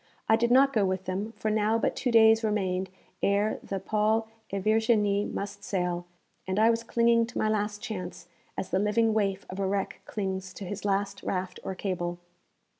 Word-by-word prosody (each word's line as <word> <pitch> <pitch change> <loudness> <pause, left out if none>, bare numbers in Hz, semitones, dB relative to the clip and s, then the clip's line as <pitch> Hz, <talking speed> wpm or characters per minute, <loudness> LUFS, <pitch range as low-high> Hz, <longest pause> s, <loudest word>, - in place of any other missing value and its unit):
I 220 - +6
did 235 +1 +1
not 270 +2 +5
go 215 - +3
with 190 -1 -1
them, 195 +4 -3
for 215 - -2
now 215 +1 +2
but - - 0
two 255 - -1
days 225 -1 +6
remained 190 -3 0 0.3
ere 200 +2 +1
the 195 - -4
Paul 215 +3 +1 0.2
et 195 -1 -2
Virginie 215 -2 +2
must 200 0 -5
sail, 180 -2 -2 0.4
and 190 +1 -1
I 220 +2 +5
was 230 0 -1
clinging 230 0 +3
to 245 - -8
my - - +1
last 210 -1 -1
chance, 185 -5 -6 0.3
as - - -3
the 185 - +2
living 215 +2 +2
waif 200 -2 0
of 190 - -7
a 195 - 0
wreck 195 0 -2
clings 190 -2 -4
to 200 - -7
his 205 +2 -6
last 200 0 0
raft 185 -1 -3
or 190 - -4
cable. 175 -2 -3
205 Hz, 190 wpm, -28 LUFS, 190-220 Hz, 0.4 s, I